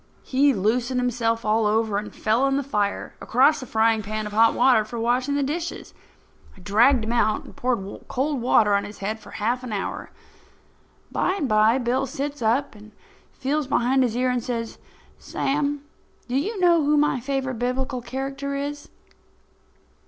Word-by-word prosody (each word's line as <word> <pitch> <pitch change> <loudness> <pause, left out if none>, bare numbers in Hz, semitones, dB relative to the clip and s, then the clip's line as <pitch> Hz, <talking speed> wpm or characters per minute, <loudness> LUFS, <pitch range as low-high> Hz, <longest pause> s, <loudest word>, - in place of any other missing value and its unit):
He 280 +2 +3
loosened 245 +4 0
himself 230 -2 -1
all 215 0 +2
over 215 -1 +1
and 210 - -8
fell 230 +5 +1
in 275 0 +1
the 280 - -1
fire 210 -7 -2
across 265 +6 +3
the 255 - -8
frying 225 0 +2
pan 215 +1 -4
of 210 - -6
hot 225 +1 +4
water 245 -3 +4
for 230 +2 -7
washing 250 +4 0
the 285 - +1
dishes. 325 +5 -4 0.6
I - - -15
dragged 220 +7 +3
him 220 - -3
out 235 -3 +1
and - - -14
poured 235 -6 -3
cold 275 0 -1
water 215 -4 +4
on 200 - +2
his 205 - -9
head 215 +3 -4
for - - -14
half 240 +4 -2
an 250 - -6
hour. 200 -2 -4 1.0
By 375 - 0
and 305 -9 -2
by, 215 +2 +4
Bill 260 +2 0
sits 280 +2 -5
up 240 +6 +1
and 215 0 -15 0.4
feels 280 +2 -2
behind 265 -1 +2
his 240 -2 0
ear 255 0 +1
and 245 -2 -1
says: 230 -2 -4 0.4
"Sam, 285 0 -2 0.4
do 245 - -3
you 390 +10 -1
know 340 -3 +4
who 295 +1 +3
my 295 -3 +2
favourite 265 -1 -3
Biblical 255 +1 -2
character 270 +3 -4
is?" 290 +1 -5
250 Hz, 175 wpm, -24 LUFS, 220-275 Hz, 1.0 s, hot